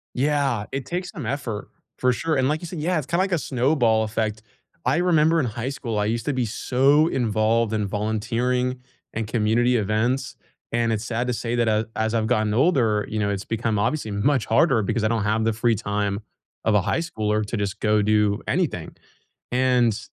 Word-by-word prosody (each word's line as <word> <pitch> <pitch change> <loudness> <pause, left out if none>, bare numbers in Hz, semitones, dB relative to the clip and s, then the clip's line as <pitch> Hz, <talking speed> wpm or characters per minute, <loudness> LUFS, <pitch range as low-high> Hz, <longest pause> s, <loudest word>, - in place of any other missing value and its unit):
Yeah, 135 -5 +1
it 135 -1 -3
takes 180 +1 -3
some 145 -9 -7
effort. 120 -5 -4 0.3
For 125 0 +3
sure. 160 +3 -1
And 130 0 +2
like 155 +3 -1
you - - -5
sai 170 +1 -7
Yeah, 175 +4 0
it's 150 -4 -2
kinda 170 +2 +1
like 190 -1 -2
a - - +4
snowball 125 -5 +2
effect. 110 0 -2 0.5
I 130 - +3
remember 165 -2 +3
in 155 - +2
high 115 +3 -4
school, 115 -6 -3
I 105 - +1
used 115 +1 -1
to 145 - 0
be 125 -2 0
so 135 +7 +3
involved 115 -3 +1
in 105 -2 0
volunteering 120 +5 -1 0.3
and 110 -1 -3
community 120 +2 +2
events, 120 +5 0 0.4
and 115 -1 +1
it's 110 +1 -3
sad 120 +1 -2
to 125 - -1
say 115 +1 -3
that, 120 -1 +2
a 110 0 +1
as 110 +1 0
I've 110 -1 +1
gotten 110 -1 +1
older, 120 - +2
you 110 - -2
know, 100 - 0
it's 100 -1 -3
become 115 -1 -1
obviously 115 +2 -1
much 130 +5 +1
harder 115 0 +3
because 110 +2 -1
I - - +3
don't 115 -2 0
have 110 +2 +1
the 115 - +2
free 115 +2 +1
time 105 -1 -2 0.4
of 110 - +2
a 105 - +5
high 95 - 0
schooler 110 -9 -1
to 110 - -3
just 100 -1 -3
go 105 0 +3
do 105 -1 +2
anything, - - -1 0.5
and 125 -3 +2
115 Hz, 205 wpm, -23 LUFS, 110-130 Hz, 0.5 s, a